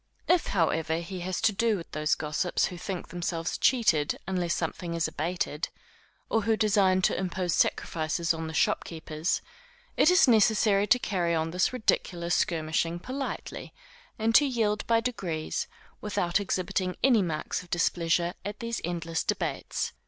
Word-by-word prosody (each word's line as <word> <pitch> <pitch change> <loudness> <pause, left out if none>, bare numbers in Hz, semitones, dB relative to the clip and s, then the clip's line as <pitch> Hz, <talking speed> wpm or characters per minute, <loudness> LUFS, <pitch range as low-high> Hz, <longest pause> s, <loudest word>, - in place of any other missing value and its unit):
If 355 -1 +3
however 160 -3 +1
he 175 +2 -5
has 180 +1 -3
to 225 -1 +4
do 220 +1 +1
with 170 - -9
those 155 0 +1
gossips 155 +4 0
who 180 - -5
think 185 -2 -5
themselves 170 -1 -3
cheated 175 - +2
unless 180 -2 -1
something 170 +1 -3
is 165 -1 +1
abated, 160 0 -2 0.6
or 225 - +1
who 220 +1 +1
design 195 -3 +3
to - - +3
impose 180 -2 -1
sacrifices 165 +1 0
on 160 0 -4
the 160 - -6
shopkeepers, 160 0 -1 0.5
it - - +6
is 365 -3 +6
necessary 215 -3 +4
to 250 - +5
carry 175 -8 0
on 160 0 -1
this 180 +2 +1
ridiculous 175 -8 0
skirmishing 165 +1 0
politely, 260 +9 -6 0.4
and 225 +1 +1
to 290 - +7
yield 220 -5 0
by 230 0 +3
degrees, 180 -10 -3 0.3
without 180 -4 0
exhibiting 185 -1 -1
any 245 -5 +5
marks 160 -4 -2
of 180 - -16
displeasure 170 0 +1
at 205 +2 -5
these 230 -1 -3
endless 165 -1 -2
debates. - - -2
180 Hz, 150 wpm, -28 LUFS, 165-210 Hz, 0.6 s, to